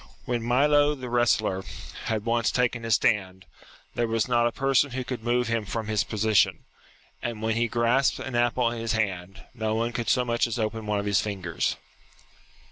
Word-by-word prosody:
When 120 -1 -1
Milo, 145 +5 +3
the 130 -3 -7
wrestler, 110 -5 +2 0.4
had 110 -1 -2
once 115 0 +1
taken 125 -1 0
his 115 -2 +2
stand, 95 -2 0 0.5
there 120 - 0
was 115 0 0
not 120 -1 +3
a - - -1
person 135 +2 +2
who 130 +1 -4
could 125 -2 -5
move 120 0 +1
him 115 -1 0
from 110 +2 -4
his 105 -1 +1
position; 110 -2 +1 0.6
and 115 -2 -4
when 110 0 0
he 120 +1 +1
grasped 120 +3 +2
an 130 - -6
apple 120 0 +2
in 120 - -5
his 115 0 -1
hand, 95 -3 -3
no 110 -2 -2
one 115 +1 0
could 120 -1 -3
so 125 -1 +2
much 120 0 +1
as 115 - -4
open 110 -1 -3
one 105 0 0
of 100 - -2
his 100 -1 +2
fingers. 95 -5 -2
115 Hz, 195 wpm, -26 LUFS, 110-120 Hz, 0.6 s, Milo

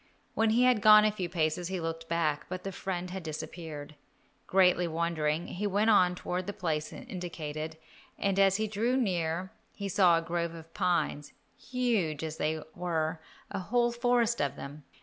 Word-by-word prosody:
When 225 0 +2
he 235 +3 +4
had 250 -4 +4
gone 215 +1 +8
a 215 - +3
few 185 -4 -4
paces 170 0 0
he 190 0 -3
looked 165 0 -5
back, 160 -3 0
but 185 0 -5
the 195 - -4
friend 180 -1 -4
had 190 0 -4
disappeared. 155 -1 -7 0.5
Greatly 180 -2 +4
wondering, 165 -1 -1
he 205 +3 -3
went 205 +3 +3
on 180 -4 +5
toward 180 +1 -3
the 205 - -3
place 155 -4 -2
indicated, 160 -3 -6 0.4
and 195 -1 0
as 195 -1 +5
he 215 +2 0
drew 225 +5 0
near 180 -5 -1 0.2
he 200 - -4
saw 180 -3 +5
a - - 0
grove 170 0 -2
of 165 0 -12
pines, 160 -4 0 0.2
huge 230 -12 0
trees 160 0 -4
they 155 +1 -1
were, 165 -2 -2 0.3
a - - -2
whole 240 +5 +1
forest 240 -1 +2
of 140 - 0
them. 145 +1 -9
180 Hz, 175 wpm, -30 LUFS, 160-200 Hz, 0.5 s, gone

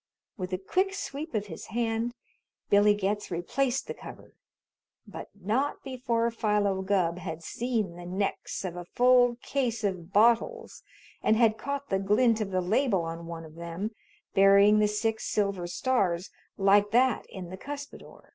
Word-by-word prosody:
With 185 -2 -5
a 185 - 0
quick 375 - 0
sweep 305 - -5
of 210 -1 0
his 165 -6 -9
hand 230 +1 -1 0.6
Billy 205 +1 +6
Getz 205 +1 -2
replaced 250 +10 -1
the - - -5
cover, - - -12 0.7
but - - -9
not 230 +9 -1
before 245 -3 -1
Philo 210 -4 +1
Gubb 185 -3 +1
had 165 -2 -6
seen 230 -2 -2
the 175 0 -8
necks 195 +1 -3
of 180 -2 -4
a 175 - -6
full 245 +3 +4
case 240 -5 -1
of 185 -3 -2
bottles 235 - +2 0.4
and 220 - +3
had 220 -1 +4
caught 280 0 -4
the 195 - +1
glint 220 +3 +3
of 205 - -2
the 185 -1 0
label 200 0 +1
on 165 0 -6
one 165 -1 -7
of 155 - -13
them, 170 +6 -5 0.4
bearing 200 +2 +6
the 210 - +4
six 220 +1 -1
silver 200 -4 0
stars, 185 -4 0 0.3
like 200 +1 +4
that 245 +2 +2
in 180 -3 -8
the 185 - -7
cuspidor. 285 +3 -9
210 Hz, 160 wpm, -28 LUFS, 185-240 Hz, 0.7 s, Billy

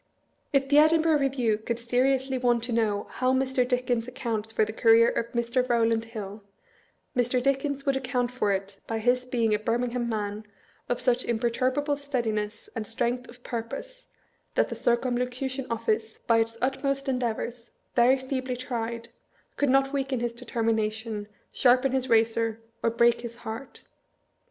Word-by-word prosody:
If 275 -1 +2
the 290 +1 +6
Edinburgh 315 0 +4
Review 255 -6 +1
could 230 +1 -3
seriously 260 +2 +1
want 240 -2 +2
to 240 - -3
know 215 -3 +1
" - - -22
how 255 0 +3
Mr. 260 -1 +1
Dickens 245 -2 0
accounts 230 -4 -3
for 220 -1 +2
the 220 - -6
career 230 0 +6
of 235 0 -2
Mr. 235 +1 +1
Eowland 230 -2 +2
Hill," 215 -2 -7 0.7
Mr. 245 +1 +2
Dickens 275 +2 0
would 275 -1 +2
account 250 -2 -1
for 250 -5 0
it 195 0 -3
by 225 - -2
his 250 +3 +1
being 230 -3 +1
a 210 - +2
Biimiagham 240 +2 -1
man 210 -1 -3 0.5
of 245 - 0
such 250 0 +2
imperturbable 255 +5 0
steadiness 225 -6 -2
and 220 -2 -4
strength 245 +2 -2
of 245 +1 -15
purpose, 275 - -6 0.5
that - - +2
the - - -4
Circumlocution 250 +2 -1
Office, 435 - -1
by 230 -1 +2
its 225 0 -1
utmost 275 +1 0
endeavors, 240 -2 -2 0.3
very 250 +2 +5
feebly 260 -1 -3
tried, 235 -2 -4 0.5
could 285 - +1
not 270 +1 +3
weaken 270 -2 -1
his 240 0 -2
determination, 220 -3 -2 0.2
sharpen 255 +1 +4
his 260 -1 -1
razor, 225 0 +2 0.2
or - - +2
break 235 +1 +3
his 235 -1 -6
heart. 240 +3 -8
245 Hz, 155 wpm, -27 LUFS, 230-260 Hz, 0.7 s, the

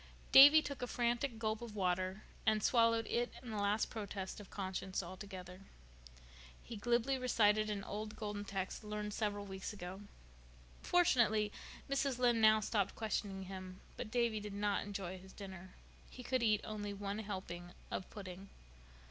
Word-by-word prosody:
Davy 290 +3 +10
took 280 -3 -5
a 250 - -1
frantic 240 +1 0
gulp 220 0 -1
of 230 -3 -7
water 185 +1 0 0.2
and 215 -1 +2
swallowed 230 -2 +4
it 240 +2 0
and 235 -3 -6
the - - -2
last 205 +2 +1
protest 200 -3 -5
of 205 - -11
conscience 190 -1 -3 0.2
together. 185 -2 -8 1.0
He 235 - -7
glibly 240 +4 +1
recited 215 -4 +3
an 200 -2 -2
old 210 +2 -5
Golden 205 -1 -4
Text 195 +1 -4
learned 210 0 -4
several 205 -2 -1
weeks 190 +2 -5
ago. 190 0 -7 0.8
Fortunately 235 -12 +3 0.4
Mrs. 275 -2 0
Lynde 240 -2 +3
now 215 0 +7
stopped 205 -2 0
questioning 205 -3 -2
him; 185 -1 -8 0.2
but 240 - -5
Davy 235 -2 +1
did 205 -1 -6
not 205 0 +1
enjoy 190 -2 -5
his 190 +1 -14
dinner. 190 -2 -9 0.3
He 250 - -10
could 255 0 0 0.2
only 210 -1 -4
eat - - -9
one 200 +1 -3
helping 180 -4 -6 0.2
of 185 - -4
pudding. 190 -1 -8
210 Hz, 155 wpm, -36 LUFS, 195-230 Hz, 1.0 s, Davy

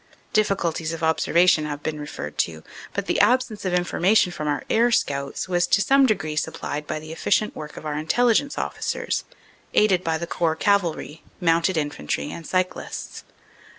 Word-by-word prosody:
Difficulties 175 -6 0
of 165 0 -6
observation 160 0 +3
have 145 -1 -5
been 155 -1 -3
referred 145 - -7
to, 80 -1 -1 0.3
but - - -1
the - - 0
absence 250 -5 +2
of 185 - 0
information 180 +2 +3
from 155 -3 -4
our 145 - -1
air 235 +2 +3
scouts 140 -9 -1
was 175 -1 +1
to - - +3
some 270 +6 +5
degree 155 -9 -1
supplied 150 0 -3
by - - -2
the 155 +1 -10
efficient 205 +6 0
work 150 -1 -8
of - - -9
our 150 -1 -2
Intelligence 240 - +2
Officers, - - -2 0.5
aided 190 -4 +4
by 165 -1 0
the 170 - -4
Corps 165 -1 0
Cavalry, 170 -4 0 0.2
mounted 170 0 +2
infantry 110 - -2
and 165 - -8
cyclists. 185 0 -3
165 Hz, 165 wpm, -23 LUFS, 150-200 Hz, 0.5 s, some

